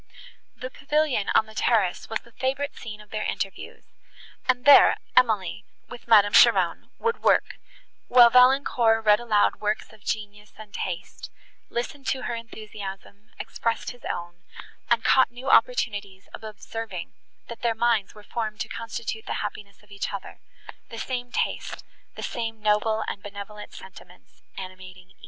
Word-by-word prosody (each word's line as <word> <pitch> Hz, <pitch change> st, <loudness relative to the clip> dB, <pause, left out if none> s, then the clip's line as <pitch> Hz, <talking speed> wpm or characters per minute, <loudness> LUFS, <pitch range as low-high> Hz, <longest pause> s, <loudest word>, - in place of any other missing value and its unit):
The 255 Hz, +1 st, -7 dB
pavilion 285 Hz, -7 st, 0 dB
on 220 Hz, -, +5 dB
the 220 Hz, -, -14 dB
terrace 215 Hz, -5 st, +1 dB
was 225 Hz, -, -2 dB
the 235 Hz, -, -20 dB
favourite 270 Hz, +4 st, -2 dB
scene 215 Hz, -2 st, -8 dB
of 210 Hz, -, -18 dB
their 215 Hz, -, -3 dB
interviews, 195 Hz, -2 st, -5 dB, 0.6 s
and 250 Hz, 0 st, +2 dB
there 285 Hz, -1 st, +8 dB, 0.2 s
Emily, 210 Hz, -5 st, +2 dB, 0.3 s
with 245 Hz, -, -11 dB
Madame 205 Hz, -3 st, +6 dB
Cheron, 190 Hz, -8 st, +5 dB
would 460 Hz, 0 st, -1 dB
work, -, -, +2 dB, 0.5 s
while 240 Hz, -1 st, +7 dB
Valancourt 250 Hz, -3 st, +4 dB
read 210 Hz, 0 st, +6 dB
aloud 220 Hz, -4 st, +2 dB
works 210 Hz, +1 st, -2 dB
of 210 Hz, -, -18 dB
genius 210 Hz, 0 st, -5 dB
and 215 Hz, -1 st, -12 dB
taste, 175 Hz, -2 st, -5 dB, 0.4 s
listened 265 Hz, +3 st, -4 dB
to 260 Hz, -, -1 dB
her 240 Hz, -, -2 dB
enthusiasm, 210 Hz, -3 st, -9 dB
expressed 230 Hz, -1 st, -3 dB
his 245 Hz, -, -16 dB
own, 175 Hz, 0 st, -5 dB, 0.5 s
and 235 Hz, -1 st, +3 dB
caught 260 Hz, -, +5 dB
new 250 Hz, +3 st, -3 dB
opportunities 205 Hz, -, +1 dB
of -, -, -9 dB
observing, 215 Hz, -3 st, -7 dB, 0.3 s
that 235 Hz, -, -9 dB
their 235 Hz, -1 st, +1 dB
minds 225 Hz, -4 st, +1 dB
were 210 Hz, -, -13 dB
formed 215 Hz, -1 st, -4 dB
to -, -, -2 dB
constitute 225 Hz, -1 st, -5 dB
the -, -, -2 dB
happiness 200 Hz, -1 st, -8 dB
of 205 Hz, -, -23 dB
each 200 Hz, -, -4 dB
other, 200 Hz, -1 st, -7 dB, 0.5 s
the 230 Hz, -, -8 dB
same 245 Hz, +1 st, -4 dB
taste, -, -, -2 dB, 0.3 s
the -, -, -7 dB
same 225 Hz, -2 st, -4 dB
noble 215 Hz, +1 st, +1 dB
and 200 Hz, -, -4 dB
benevolent 205 Hz, +1 st, -9 dB
sentiments -, -, -15 dB, 0.2 s
animating 185 Hz, -1 st, -10 dB
e -, -, -24 dB
220 Hz, 155 wpm, -25 LUFS, 205-240 Hz, 0.6 s, there